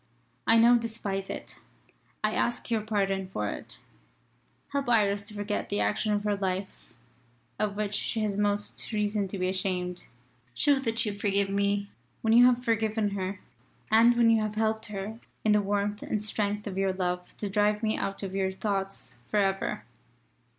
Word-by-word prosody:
I 225 - +6
now 235 +2 +7
despise 210 -4 -3
it. - - -7 0.7
I 215 0 +2
ask 240 0 -1
your 225 -2 +2
pardon 195 -3 0
for 105 - -2
it. - - -9 0.9
Help 280 -2 -1
Iris 205 -3 +2
to 210 - -9
forget 205 0 -2
the 205 - 0
action 215 0 +1
of 205 0 +1
her 210 -1 +1
life 190 0 -3 0.7
of 210 -1 0
which 210 0 -2
she 220 +2 -1
has 205 -2 0
most 205 +2 -1
reason 210 -2 0
to 195 - -5
be 185 0 0
ashamed. 180 -1 -2 0.5
Show 280 - +4
that 230 -2 0
you 210 - -1
forgive 200 -1 +1
me 200 0 0 0.3
when 225 0 +3
you 245 +2 +8
have 250 0 +2
forgiven 220 -2 +1
her 190 -1 -3 0.5
and 230 +2 +6
when 230 -1 +6
you 225 -1 +4
have 215 0 -2
helped 220 0 0
her 210 +2 -5 0.3
in 215 - +5
the 210 0 +5
warmth 205 +1 -1
and 215 - -1
strength 210 0 -2
of 195 -2 -3
your 195 -1 +2
love 180 -1 -3
to 210 - -3
drive 210 +2 +1
me 215 0 +2
out 195 +1 -3
of 190 -1 -4
your 190 -1 0
thoughts 195 - -3
for - - 0
ever. 195 -1 0
205 Hz, 180 wpm, -28 LUFS, 195-220 Hz, 0.9 s, you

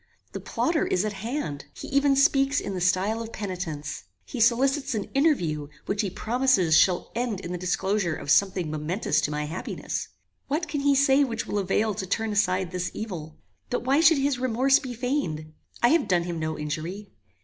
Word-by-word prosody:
The - - -5
plotter 325 -1 0
is 185 +3 +1
at 210 - -2
hand. 205 - -4
He - - -8
even 280 0 +3
speaks 275 -1 +3
in 200 - -4
the 185 - -3
style 190 +5 +1
of 230 0 -7
penitence. 180 -8 -5 0.2
He 255 - -6
solicits 265 +4 +2
an 205 - -4
interview 175 - +1 0.2
which 200 +1 0
he 200 - -2
promises 225 -6 +2
shall 180 +2 +3
end 235 -4 -2
in 170 - -6
the 180 - -2
disclosure 190 -1 0
of 140 - -3
something 185 -4 +2
momentous 155 +2 0
to - - -1
my 150 0 -2
happiness. 165 +5 -4 0.4
What 310 +4 -1
can 290 -1 -2
he 280 0 +3
say 275 +1 +5
which 230 -4 -2
will 205 - -1
avail 205 +3 +1
to 190 -2 -5
turn 225 +3 -1
aside 190 -3 +1
this 180 -1 -2
evil? 170 -8 -6 0.3
But 245 - -1
why 270 +4 +3
should 325 -1 +6
his 275 -2 0
remorse 255 +2 +3
be 250 -2 -6
feigned? 195 - -2 0.3
I 240 - +7
have 330 +5 +3
done 175 -2 +2
him 170 -1 -4
no 155 0 -2
injury. 160 +7 -5
210 Hz, 195 wpm, -26 LUFS, 175-265 Hz, 0.4 s, I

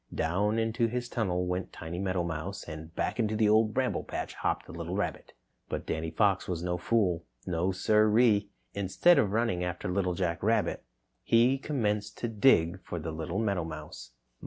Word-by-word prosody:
Down 100 +7 +1
into 115 +1 +1
his 120 +1 -3
tunnel 90 -7 -1
went 90 +1 -3
Timmy 85 +2 -6
Meadowmouse 90 0 -3
and 80 0 -8
back - - -2
into 110 -2 +1
the 110 0 +3
Old 110 +1 +4
Bramble 130 +2 0
Patch - - -5
hopped - - -2
the - - -11
little - - -5
rabbit. - - -3 0.4
But - - -3
Danny 80 +1 -2
Fox 95 +3 +2
was 85 -2 -3
no 90 0 -1
fool. 90 -5 +1 0.2
No, 90 +1 0
sir 105 +3 +3
e 125 - +6
e! 100 -2 +2 0.2
Instead 100 - +4
of 100 - +2
running 110 -5 0
after 90 0 -3
Little 90 -1 0
Jack 85 -2 -1
Rabbit, 110 +3 +1 0.4
he 120 +4 +3
commenced 105 -8 -1
to 120 - -2
dig 100 -6 +3
for 85 - -5
the 80 0 -4
little 80 +4 -4
meadowmouse. 80 - -3
95 Hz, 180 wpm, -29 LUFS, 85-110 Hz, 0.4 s, e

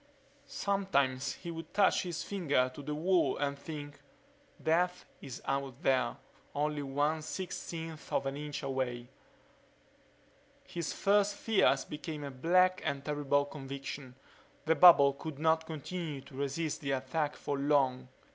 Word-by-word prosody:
Sometimes 140 -10 0
he 170 - -7
would 165 -1 -8
touch 200 -1 +4
his 175 -3 -4
finger 145 -10 +1
to 145 - -8
the 150 +1 -4
wall 170 -3 +2
and 140 0 -1
think, 145 0 -8 0.6
Death 180 +3 +1 0.2
is 130 -2 -8
out 135 +1 -2
there, 130 -4 +2 0.4
only 150 0 0
one 145 +3 0
sixteenth 165 -2 -6
of - - +1
an 135 0 -2
inch 150 0 -5
away. 125 -2 -2 1.6
His 170 -4 -4
first 205 0 +2
fears 200 -13 +3
became 150 0 -6
a 140 - -5
black 185 +7 +3
and 140 0 -2
terrible 145 -1 +1
conviction: 135 -2 -7 0.5
the 160 - +4
bubble 150 -4 +8
could 145 +1 -7
not 160 +1 +2
continue 160 -1 -5
to 140 - -16
resist 140 +4 -2
the 140 -2 -1
attack 145 +3 -1
for 140 -1 -3
long. 135 -3 +2
145 Hz, 135 wpm, -32 LUFS, 135-165 Hz, 1.6 s, bubble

